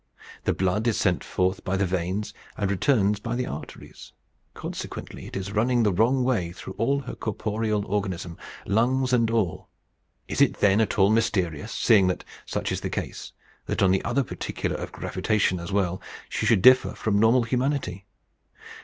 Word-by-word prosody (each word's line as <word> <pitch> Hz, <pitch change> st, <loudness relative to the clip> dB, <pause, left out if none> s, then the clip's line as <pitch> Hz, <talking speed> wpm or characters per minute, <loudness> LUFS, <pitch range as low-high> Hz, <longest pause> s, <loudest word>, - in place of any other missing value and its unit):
The -, -, +2 dB
blood 95 Hz, +5 st, 0 dB
is 115 Hz, -, +2 dB
sent 90 Hz, -3 st, +1 dB
forth 95 Hz, +1 st, -1 dB
by 95 Hz, +1 st, -1 dB
the 95 Hz, -, +2 dB
veins, 95 Hz, +3 st, -2 dB, 0.2 s
and 100 Hz, -2 st, 0 dB
returns 105 Hz, 0 st, +2 dB
by 115 Hz, +2 st, -3 dB
the 125 Hz, +1 st, -1 dB
arteries. 75 Hz, -, -9 dB, 0.4 s
Consequently -, -, -7 dB
it -, -, -9 dB
is 95 Hz, 0 st, -4 dB
running 120 Hz, +3 st, +2 dB
the 105 Hz, -3 st, +2 dB
wrong 120 Hz, +7 st, +3 dB
way 110 Hz, -10 st, 0 dB
through 95 Hz, +2 st, -9 dB
all 140 Hz, +5 st, +1 dB
her 125 Hz, -, -7 dB
corporeal 110 Hz, -1 st, -2 dB
organism 95 Hz, -4 st, -3 dB, 0.3 s
lungs 125 Hz, +4 st, +1 dB
and 115 Hz, -2 st, +3 dB
all. 110 Hz, -8 st, -1 dB, 0.6 s
Is -, -, -1 dB
it -, -, +4 dB
then 105 Hz, +1 st, +4 dB
at 110 Hz, -, 0 dB
all 100 Hz, +1 st, +5 dB
mysterious, 95 Hz, -9 st, 0 dB
seeing 100 Hz, -5 st, +4 dB
that 90 Hz, -, -1 dB, 0.2 s
such -, -, -2 dB
is -, -, -2 dB
the -, -, -3 dB
case, -, -, -5 dB, 0.3 s
that -, -, 0 dB
on 95 Hz, -, +5 dB
the 95 Hz, -, +1 dB
other 120 Hz, +4 st, +1 dB
particular -, -, -4 dB
of -, -, -5 dB
gravitation 95 Hz, -1 st, 0 dB
as 85 Hz, +3 st, -6 dB
well, 95 Hz, -2 st, 0 dB, 0.3 s
she -, -, -1 dB
should 95 Hz, -, +3 dB
differ 130 Hz, 0 st, +6 dB
from 100 Hz, -2 st, 0 dB
normal 115 Hz, +3 st, +5 dB
humanity? 125 Hz, -6 st, -1 dB
105 Hz, 175 wpm, -25 LUFS, 95-115 Hz, 0.6 s, differ